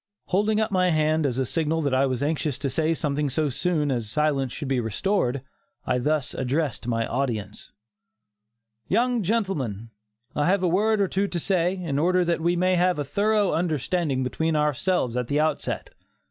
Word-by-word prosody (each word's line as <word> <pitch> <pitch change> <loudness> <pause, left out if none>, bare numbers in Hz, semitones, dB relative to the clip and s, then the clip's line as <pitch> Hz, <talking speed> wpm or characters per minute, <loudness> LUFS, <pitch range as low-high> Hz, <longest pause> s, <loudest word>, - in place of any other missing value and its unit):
Holding 210 +3 +2
up 220 - 0
my 185 -1 +3
hand 155 -1 +2
as 125 -2 -2
a 130 - +1
signal 160 +3 0
that 140 -2 0
I 135 +1 +3
was 130 0 -2
anxious 150 -2 -1
to 140 -1 -3
say 160 +4 +1
something 150 -1 -1
so 150 +3 0
soon 150 +1 0
as 120 -4 -2
silence 140 -1 0
should 145 - -5
be 135 -1 +1
restored, 125 - -1 0.4
I 125 0 +1
thus 150 +2 0
addressed 135 -1 -2
my 115 -1 0
audience: 115 -6 -3 1.2
"Young 245 0 +2
gentlemen, 160 - -2 0.4
I 145 +2 +1
have 190 +1 +2
a - - +3
word 210 +4 +2
or 195 - +3
two 195 +2 0
to 175 - -2
say, 180 0 +1
in 165 -7 -2
order 180 +3 +3
that 170 -1 0
we 170 +2 +2
may 185 +1 +2
have 180 -1 +2
a 145 - -1
thorough 205 +6 +1
understanding 160 -3 0
between 160 +5 -1
ourselves 150 -2 +1
at 125 -1 -1
the 145 +2 +1
outset. 155 +1 -1
155 Hz, 185 wpm, -25 LUFS, 135-180 Hz, 1.2 s, my